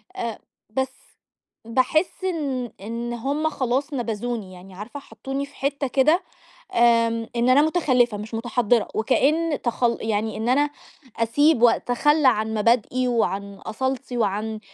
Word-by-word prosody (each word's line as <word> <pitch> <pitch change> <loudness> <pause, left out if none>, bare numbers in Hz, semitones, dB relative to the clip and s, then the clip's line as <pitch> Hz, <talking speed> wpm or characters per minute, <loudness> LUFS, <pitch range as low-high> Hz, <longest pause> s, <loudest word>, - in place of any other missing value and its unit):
أ 230 -2 -3 0.3
بس 265 +4 -1 0.7
باحس 265 +10 0
إن 280 -9 -2
إن 235 +3 -4
هُم 285 +6 -1
خلاص 270 +2 -1
نبَذوني 230 -4 -3
يعني، 185 +1 -13
عارفة، 220 +9 -8
حَطّوني 275 0 -5
في 280 - -19
حِتّة 280 0 -1
كده، 305 +8 +3 0.5
آمم 230 -1 +3
إن 240 +1 +2
أنا 275 +3 +6
مُتخلِّفة 255 -9 +2
مش 215 +2 -8
مُتحضِّرة 235 -1 +1
وكأن 295 +7 +1
تخل 240 0 +1
يعني 220 0 -1
إن 225 +3 -1
أنا 290 +3 +3 0.5
أسيب 240 +4 +3
وأتخلّى 265 +5 +3
عن 220 -2 +2
مبادئي 240 +3 +2
وعن 200 -4 -1
أصالتي 260 +4 -4
وعن 215 0 -1
240 Hz, 130 wpm, -23 LUFS, 225-275 Hz, 0.7 s, أنا